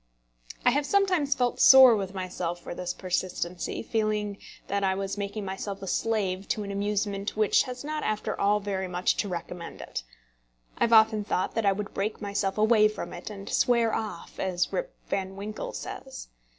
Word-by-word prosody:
I 245 - +6
have 285 +2 0
sometimes 365 -8 +2
felt 245 -1 0
sore 265 -3 +9
with 195 -2 -4
myself 180 -2 -3
for 175 - -7
this 180 0 -3
persistency, 180 -1 -3
feeling 215 -2 -1 0.3
that 200 0 -1
I 190 -1 +2
was 195 0 -3
making 200 0 -4
myself 195 +1 -4
a - - -3
slave 195 -2 -1
to 210 - -1
an 200 - -5
amusement 200 0 -2
which 215 -2 +4
has 250 +1 -6
not 305 +1 -3
after 215 0 -2
all 205 +1 +3
very 195 -2 -3
much 180 0 +1
to 205 - 0
recommend 175 -1 -6
it. - - -5 0.8
I - - +4
have 235 - +1
often 220 -1 +6
thought 185 -2 -1
that 225 -3 0
I - - +6
would 200 +1 -4
break 210 +2 -2
myself 200 -1 -2
away 215 0 +5
from 215 - -6
it, - - -7
and 200 -1 -9
"swear 235 -2 +2
off," 210 -6 -5
as 180 -2 -1
Rip - - -3
Van 190 -1 -2
Winkle 205 +2 -5
says. - - -7
205 Hz, 185 wpm, -27 LUFS, 190-220 Hz, 0.8 s, sore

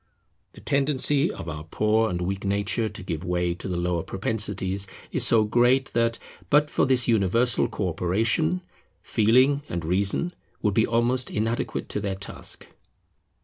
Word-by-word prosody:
The - - -14
tendency 140 +1 +1
of - - -8
our 75 -2 -5
poor 110 +6 +1
and 90 -1 -3
weak 95 +2 -3
nature 100 +3 0
to 105 0 -9
give 80 -2 -4
way 90 -1 0
to 90 - -8
the 90 -2 -2
lower 85 -1 0
propensities 95 0 -1 0.2
is - - +1
so 115 -2 +4
great 120 +5 +2
that, 115 0 +1 0.3
but 150 0 +3
for - - +2
this 130 -2 +2
universal 115 +2 +3
co 95 - -2
operation, 115 - +1 0.4
Feeling 130 +6 +3
and 85 -2 -3
Reason 100 - 0 0.3
would 105 -2 +2
be 110 - +3
almost 120 +2 +1
inadequate 115 +2 -2
to - - -2
their 100 -2 -2
task. 100 +1 -7
105 Hz, 155 wpm, -25 LUFS, 95-120 Hz, 0.4 s, so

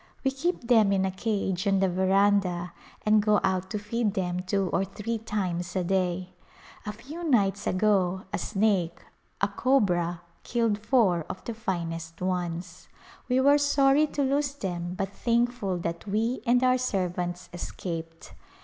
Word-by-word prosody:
We 270 - +2
keep 330 +7 -1
them 220 -5 +5
in 190 -1 +2
a 190 - -1
cage 195 -1 -1
on 195 0 +3
the 195 - +3
veranda 190 -1 +2 0.3
and 215 0 +5
go 210 -1 +4
out 190 0 0
to 210 - -2
feed 210 0 -1
them 180 -1 -1
two 190 +1 0
or 190 - +2
three 210 +4 -4
times 185 -5 -3
a 185 - +1
day. 185 0 -1 0.5
A - - -1
few 270 +11 -9
nights 200 - +2
ago 190 -2 +2
a - - 0
snake 195 -5 0 0.2
— - - -40
a 200 - +4
cobra 180 -7 +1
— - - -37
killed 230 -3 0
four 210 -7 +2
of 185 - -6
the 235 - -4
finest 165 -6 -4
ones. 175 -1 -3 0.4
We 250 +1 +3
were 285 +2 +5
sorry 285 +1 +4
to 290 - -1
lose 280 +1 0
them 175 -6 -4
but 195 0 -3
thankful 235 -5 0
that 170 +2 -4
we 225 +5 0
and 245 +1 +4
our 255 0 +4
servants 180 -6 -2
escaped. 165 -2 -6
195 Hz, 165 wpm, -27 LUFS, 180-230 Hz, 0.5 s, them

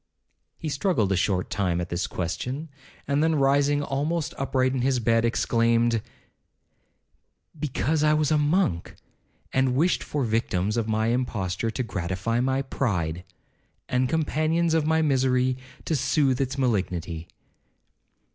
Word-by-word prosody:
He 160 - -5
struggled 140 - +1
a - - +3
short 90 0 0
time 90 -4 0
at 85 0 -4
this 85 +1 -2
question, 125 - -4 0.4
and 140 +2 +2
then 160 0 +2
rising 145 +1 +3
almost 150 +4 -2
upright 130 -1 0
in 130 - -1
his 130 0 +1
bed, 115 0 +2
exclaimed, 115 -1 +2 1.6
'Because 150 +2 0
I 150 0 +4
was 150 -1 +1
a 155 - +4
monk, 150 - 0 0.6
and 130 -1 +2
wished 165 +7 +2
for 145 -2 -2
victims 105 -3 0
of 115 -2 -1
my 110 +1 +1
imposture 115 -5 -1
to 130 +3 -2
gratify 95 +2 -2
my 130 +2 +1
pride! 90 - -2 0.6
and 125 0 +1
companions 160 +2 +1
of 160 -2 +2
my 160 0 +3
misery, 130 -3 +2 0.3
to 160 - 0
soothe 140 -1 +1
its 130 0 -2
malignity!' 90 -9 -1
130 Hz, 135 wpm, -25 LUFS, 110-145 Hz, 1.6 s, I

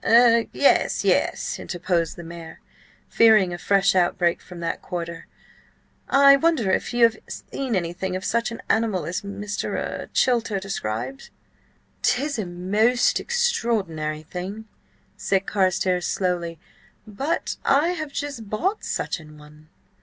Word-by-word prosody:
"Er–yes, 235 +3 +4
yes," - - +1
interposed 175 -2 -1
the 175 - -9
mayor, 165 -1 -10 0.5
fearing 215 -6 +5
a - - -4
fresh 195 +1 +3
outbreak 175 -1 +1
from 180 -2 -11
that 170 - -3
quarter. 170 -2 -6 0.8
"I 275 0 +7
wonder 275 - +2
if - - 0
you 240 -1 +2
have 230 -1 +5
seen 260 -5 -4
anything 185 +1 -2
of 185 - -4
such 235 +1 0
an 230 - -8
animal 215 -7 +1
as 180 +4 -3
Mr.–er–Chilter–described?" 200 - -2 0.7
"'Tis 280 0 0
a 200 - -3
most 205 +8 +2
extraordinary 210 - -1
thing," 190 +6 -6 0.5
said 195 0 0
Carstares 185 -2 +1
slowly, 175 -3 -1 0.5
"but 270 +11 -3
I 290 +5 +3
have 310 -5 -4
just 280 -7 -5
bought 380 - -1
such - - -2
an 155 -1 -14
one." 150 +1 -17
195 Hz, 125 wpm, -23 LUFS, 175-235 Hz, 0.8 s, I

